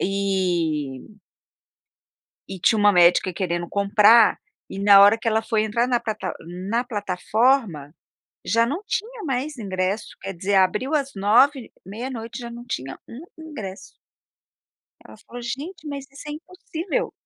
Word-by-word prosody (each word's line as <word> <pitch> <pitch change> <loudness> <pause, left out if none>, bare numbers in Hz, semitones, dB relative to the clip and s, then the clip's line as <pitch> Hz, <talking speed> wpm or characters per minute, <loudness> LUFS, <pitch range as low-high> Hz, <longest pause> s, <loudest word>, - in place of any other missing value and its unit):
e 180 -5 -2 1.3
e 190 - -7
tinha 215 +5 +3
uma 205 0 +5
médica 180 +1 +4
querendo 175 -1 -3
comprar, 210 +3 +5 0.3
e 195 - -7
na 200 0 +7
hora 205 +3 +6
que 225 - -2
ela 220 0 +1
foi 220 -1 0
entrar 235 +3 0
na 245 -2 +1
plata 215 -2 -4
n-na 185 +8 -3
plataforma, 205 - 0 0.5
já 230 +1 +2
não 295 - -3
tinha 450 +3 -4
mais 275 +1 -3
ingresso, 195 0 -2
quer 195 0 -5
dizer, 195 +4 -1
abriu 210 +10 +2
às 275 -2 -1
9, 235 +7 +3
meia-noite 230 +4 -7
já 240 -1 -7
não 240 +1 -9
tinha 135 - -5
um 260 +8 -10
ingresso. 215 -12 -8 1.2
Ela - - -14
falou: 240 +3 -11
"Gente, 300 +8 -6
mas 280 -2 -6
isso 275 +2 -11
é - - -4
impossível!" 360 +6 -5
220 Hz, 145 wpm, -23 LUFS, 190-260 Hz, 1.3 s, na